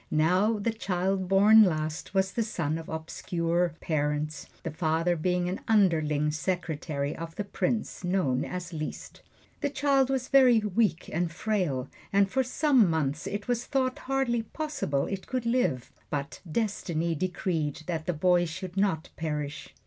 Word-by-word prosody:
Now 185 +8 +3
the 220 +2 -1
child 190 -2 -1
born 205 +4 +7
last 155 0 -2
was 190 0 +2
the 235 - -1
son 165 -8 -2
of 165 - -9
obscure 170 +1 -1
parents, 150 0 -1 0.2
the 165 - -3
father 160 +2 +1
being 180 +2 0
an 185 +3 -2
underling 155 -8 +3
secretary 155 -3 -2
of 165 0 -7
the 205 - -2
Prince, 200 +1 -2
known 175 -8 +1
as 180 -1 -5
Liszt. 155 -1 -6 0.4
The 285 - 0
child 275 -2 +2
was 265 -1 -1
very 260 -4 +6
weak 210 -4 +1
and 170 +1 0
frail, 170 -9 -1 0.2
and 195 0 +3
for 265 - +2
some 255 - +3
months 155 -2 -1
it 205 +2 -4
was 245 -1 0
thought 260 -2 0
hardly 265 -4 +1
possible 225 - -2
it 195 -1 -5
could 255 -2 -2
live; 230 - 0 0.2
but 140 -1 -4
Destiny 170 -5 -1
decreed 165 -3 -2
that 165 -3 -3
the 180 - +1
boy 175 +2 +3
should 180 +2 -6
not 190 -6 +1
perish. 150 -2 -4
180 Hz, 155 wpm, -28 LUFS, 155-215 Hz, 0.4 s, born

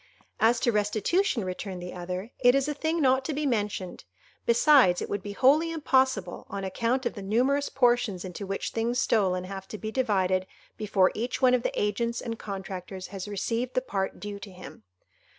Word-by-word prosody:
"As 230 +2 +4
to 240 - +3
restitution," 215 - +1
returned 185 0 -5
the 180 0 -7
other, 180 +5 -5
"it 245 0 +5
is 275 0 +2
a 300 - -1
thing 315 +3 -1
not 265 -1 +3
to 305 - -2
be 300 +1 -1
mentioned; 205 -7 -2 0.4
besides, 235 - +5
it - - -4
would 205 - -1
be 205 +1 -6
wholly 295 +9 +4
impossible, 260 - +1
on 200 0 -5
account 235 +7 -1
of - - -1
the 205 - -8
numerous 255 +8 +1
portions 240 -7 +1
into 185 +2 -6
which 195 0 -3
things 230 +2 -1
stolen 190 -7 +2
have 190 +1 -7
to 215 - -7
be 215 +1 -5
divided 190 -7 +1 0.3
before 195 -3 +2
each 240 +3 -3
one 255 -1 +5
of 250 - +3
the - - -2
agents 235 +3 -1
and 230 -1 -5
contractors 190 -2 -6
has 195 0 -6
received 230 +5 -2
the - - +4
part 195 -6 -3
due 205 -1 -6
to 200 - -9
him. 185 -9 -11
215 Hz, 190 wpm, -27 LUFS, 190-255 Hz, 0.4 s, it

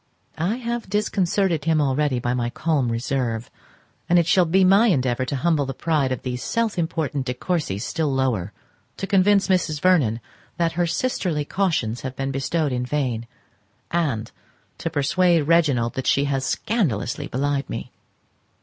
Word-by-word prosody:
I 180 +8 0
have 235 -3 -4
disconcerted 190 -5 0
him 160 -2 +3
already 140 -1 +1
by 120 0 -1
my 120 -1 -1
calm 140 -3 0
reserve, 120 -1 -2 0.6
and 175 - +5
it 170 - +4
shall 180 +2 +4
be 185 +4 +3
my 195 +5 +5
endeavour 130 - +1
to 140 - -3
humble 150 0 +1
the 135 - -4
pride 150 -5 0
of 130 - -3
these 125 -1 -3
self 230 -4 -1
important 150 -5 -2
De 125 - -2
Courcys 130 - -2
still 155 +3 -1
lower, 125 -8 0 0.5
to - - -3
convince 200 0 +3
Mrs. 175 -5 +1
Vernon 145 -11 +3 0.4
that 170 -1 +1
her 175 +1 0
sisterly 170 - -1
cautions 160 - -1
have 130 -1 -5
been 135 +1 -2
bestowed 140 +3 -1
in 125 0 -1
vain, 125 -4 -2 0.6
and 140 -10 -1 0.5
to 165 - -2
persuade 165 +3 +2
Reginald 145 -7 +2
that 130 - -4
she 140 - +3
has 135 -2 -1
scandalously 150 - -1
belied 140 +2 -1
me. - - -5
150 Hz, 160 wpm, -23 LUFS, 130-175 Hz, 0.6 s, and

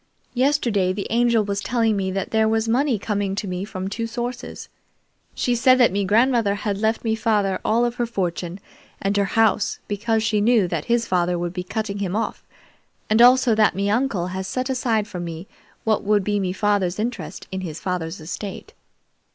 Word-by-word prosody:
"Yesterday 240 -8 +1
the 200 +1 -4
Angel 235 -2 +3
was 200 0 -2
telling 225 -1 +1
me 190 -1 -1
that 190 0 -3
there 220 0 +3
was 225 0 +1
money 250 +1 +2
coming 200 -1 -2
to 200 - -3
me 180 0 -3
from 190 -2 -5
two 230 +3 -3
sources. 240 +1 -5 0.7
She 245 - 0
said 255 +2 +5
that 245 -2 +5
me 200 +1 0
grandmother 225 0 +3
had 200 -1 -3
left 220 +1 0
me 225 -2 +1
father 210 -3 +1
all 230 +2 +2
of 240 - -1
her 240 - 0
fortune 180 -4 -3 0.4
and 195 +1 -1
her 200 -1 +2
house, 220 0 +2
because 220 +2 0
she 215 -1 +1
knew 220 -3 +4
that 165 -3 -3
his 235 0 +1
father 180 -2 +1
would 175 0 -3
be 180 - -3
cutting 200 +2 -4
him 195 -1 -2
off, 225 - -2 0.7
and 220 +2 +5
also 250 -1 +6
that 215 -1 +3
me 200 +1 0
uncle 225 -6 0
had 190 +1 -4
set 255 +6 -2
aside 230 -5 0
for 185 -5 -7
me 170 +1 -6 0.4
what 220 -2 +1
would 205 -1 +2
be 205 +1 0
me 185 -2 -1
father's 195 -2 0
interest 235 +3 -4
in 190 0 -3
his 165 -4 -6
father's 180 -1 -3
estate. 195 - -7
210 Hz, 195 wpm, -22 LUFS, 190-230 Hz, 0.7 s, also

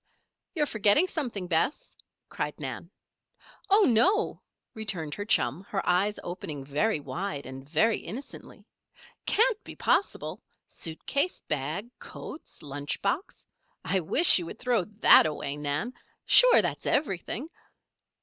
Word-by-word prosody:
"You're 300 -3 +1
forgetting 220 - +4
something, 250 - -3
Bess," 180 - -1 0.3
cried - - -5
Nan. - - -6 0.8
"Oh, 410 +2 +5
no!" 360 - +2 0.3
returned 190 -9 -3
her 205 - -5
chum, 185 -4 +1
her 195 - -3
eyes 195 +4 +1
opening 155 -6 -6
very 150 +7 0
wide 150 -1 -5
and 135 +1 -10
very 215 +8 +2
innocently. 235 +11 -9 0.6
"Can't 455 0 +2
be - - -10
possible. 400 - -1 0.2
Suit 160 -1 -6
case, 280 +6 0
bag, 155 - -4
coats, 310 - -10
lunch 145 0 -4
box 260 - -3 0.4
I 190 - +1
wish 195 - +5
you 170 - -6
would 210 - -8
throw 235 -7 0 0.2
that - - +8
away, 145 -2 -4
Nan! 150 - -3 0.3
Sure, - - +7
that's - - -3
everything." 255 - -1
200 Hz, 130 wpm, -27 LUFS, -, 0.8 s, that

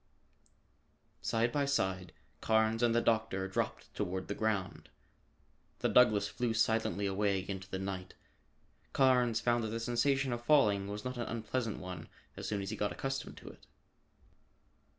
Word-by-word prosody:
Side 115 +1 +1
by 145 +1 +1
side, 95 -9 -1 0.3
Carnes 110 +1 +2
and 120 -1 +3
the 120 - +4
doctor 110 -5 +1
dropped 95 - -3
toward 95 +1 -3
the - - 0
ground. 105 -3 -2 0.9
The - - 0
Douglass 105 -5 +5
flew 115 +2 -2
silently 110 -3 +1
away 100 0 +1
into 95 -1 -5
the 95 - -3
night. 95 -1 -5 0.8
Carnes 125 -4 +4
found 120 -1 +2
that - - -1
the 115 +1 -3
sensation 130 +3 +1
of 120 0 -4
falling 105 -8 +4
was 105 +2 -6
not 125 0 -4
an 120 - -3
unpleasant 115 0 -2
one 90 -3 -7 0.3
as - - -6
soon 100 -2 -2
as 95 - -4
he - - -3
got 105 - -1
accustomed 135 0 -4
to - - -10
it. - - -16
110 Hz, 155 wpm, -33 LUFS, 100-120 Hz, 0.9 s, Douglass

